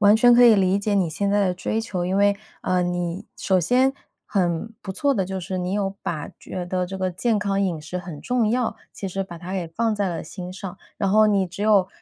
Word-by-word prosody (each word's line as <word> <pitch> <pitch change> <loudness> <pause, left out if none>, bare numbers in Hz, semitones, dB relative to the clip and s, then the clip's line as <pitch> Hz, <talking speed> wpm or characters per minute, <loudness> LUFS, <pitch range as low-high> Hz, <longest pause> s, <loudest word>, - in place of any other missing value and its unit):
完 205 +1 +7
全 245 +1 +6
可 245 0 +7
以 230 -2 +8
理 190 0 +3
解 205 0 0
你 185 -4 +2
现 200 +6 -1
在 205 -1 +3
的 180 - 0
追 215 +5 -1
求。 185 -5 -3
因 185 +2 0
为， 200 0 +4 0.3
呃， 185 -1 +1
你 175 0 -2
首 185 -2 +2
先 255 +9 +3 0.3
很 185 +2 0
不 190 - -5
错 280 +8 +1
的 195 -4 +1
就 190 +1 -4
是 185 +1 -4
你 180 +1 -2
有 200 -1 -1
把 155 -3 -3
觉 180 -1 -6
得 180 0 -1
这 190 +1 -6
个 185 -1 0
健 220 +4 +1
康 200 -1 0
饮 170 -5 -1
食 160 +4 -6
很 175 -5 -7
重 245 -3 +1
要， 245 0 0 0.2
其 195 - -6
实 195 +1 -2
把 175 -3 -9
它 180 +2 -7
给 180 -4 -2
放 220 +5 0
在 200 -2 0
了 165 -2 -3
心 180 -1 -7
上。 190 -1 -7 0.2
然 195 - 0
后 215 +2 +5
你 195 -2 +2
只 180 +4 -6
有， 200 -3 +4
190 Hz, 265 characters per minute, -23 LUFS, 180-210 Hz, 0.3 s, 以